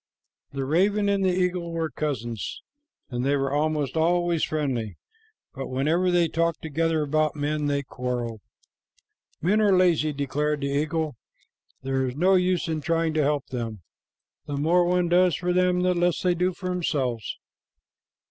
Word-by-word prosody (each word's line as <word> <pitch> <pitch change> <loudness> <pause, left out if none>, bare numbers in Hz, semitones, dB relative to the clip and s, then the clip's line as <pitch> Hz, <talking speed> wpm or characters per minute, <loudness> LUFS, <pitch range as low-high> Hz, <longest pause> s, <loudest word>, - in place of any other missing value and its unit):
The 135 -1 -3
raven 200 +8 +2
and 200 -1 +1
the 190 - +3
eagle 180 -1 0
were 165 -1 -2
cousins, 120 -7 -4 0.5
and 120 0 -2
they 140 +2 +2
were 135 -1 -1
almost 150 -2 0
always 170 0 +2
friendly, 130 - -2 0.6
but 135 -1 -5
whenever 155 +8 +1
they 175 -1 +3
talked 165 +1 -1
together 160 0 0
about 155 +1 +1
men, 150 0 -1
they 140 0 0
quarreled. 120 -4 -4 1.0
"Men 205 +6 +3
are 200 -3 +4
lazy," 170 -4 +3
declared 145 +1 -1
the 140 - -1
eagle. 155 -1 -1 0.7
"There 135 0 0
is 125 - -5
no 180 +6 +3
use 180 -2 +2
in 160 -1 -2
trying 165 0 0
to 155 - +2
help 145 -1 0
them. 115 -6 -4 0.6
The 145 - -3
more 170 +5 +3
one 180 0 +2
does 180 0 +4
for 180 0 -1
them, 180 0 +2
the 180 0 +2
less 175 -1 +1
they 180 -1 +3
do 180 +2 +1
for 185 +1 -6
themselves." 140 - -2
155 Hz, 160 wpm, -25 LUFS, 140-175 Hz, 1.0 s, are